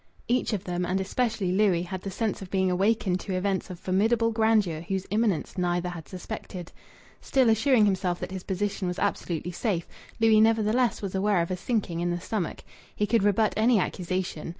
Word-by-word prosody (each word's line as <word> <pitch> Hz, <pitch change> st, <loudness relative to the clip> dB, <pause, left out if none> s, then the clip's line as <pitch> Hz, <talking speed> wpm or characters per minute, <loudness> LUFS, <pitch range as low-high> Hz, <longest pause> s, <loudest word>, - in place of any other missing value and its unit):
Each 245 Hz, +1 st, +1 dB
of 205 Hz, -4 st, -2 dB
them 180 Hz, -2 st, -2 dB
and 180 Hz, +2 st, 0 dB
especially 215 Hz, -1 st, -1 dB
Louis 190 Hz, -3 st, +3 dB
had 185 Hz, +1 st, -5 dB
the 195 Hz, -, -5 dB
sense 215 Hz, +2 st, -2 dB
of 190 Hz, -, -8 dB
being 190 Hz, -1 st, +1 dB
awakened 190 Hz, 0 st, +1 dB
to 190 Hz, -1 st, -4 dB
events 190 Hz, +1 st, -1 dB
of 180 Hz, -2 st, -8 dB
formidable 225 Hz, +5 st, +2 dB
grandeur 220 Hz, -7 st, +2 dB
whose 190 Hz, +2 st, -3 dB
imminence 205 Hz, -5 st, 0 dB
neither 175 Hz, 0 st, 0 dB
had 170 Hz, -3 st, -8 dB
suspected. 185 Hz, -2 st, -7 dB, 0.5 s
Still 260 Hz, -4 st, +3 dB
assuring 225 Hz, 0 st, +4 dB
himself 185 Hz, -3 st, 0 dB
that -, -, -4 dB
his 190 Hz, -1 st, -5 dB
position 195 Hz, 0 st, -2 dB
was 180 Hz, +1 st, -3 dB
absolutely 175 Hz, -4 st, -2 dB
safe, 175 Hz, -2 st, -2 dB, 0.3 s
Louis 220 Hz, -1 st, +5 dB
nevertheless 225 Hz, +2 st, +2 dB
was 195 Hz, -, -3 dB
aware 195 Hz, -2 st, +2 dB
of 170 Hz, -, -5 dB
a -, -, 0 dB
sinking 185 Hz, -4 st, -2 dB
in 175 Hz, 0 st, 0 dB
the 175 Hz, 0 st, -1 dB
stomach. 185 Hz, -1 st, -3 dB, 0.3 s
He 210 Hz, -, +1 dB
could 230 Hz, +1 st, +2 dB
rebut 205 Hz, +2 st, +2 dB
any 225 Hz, +2 st, +4 dB
accusation. 185 Hz, -3 st, -2 dB
195 Hz, 190 wpm, -27 LUFS, 180-220 Hz, 0.5 s, Louis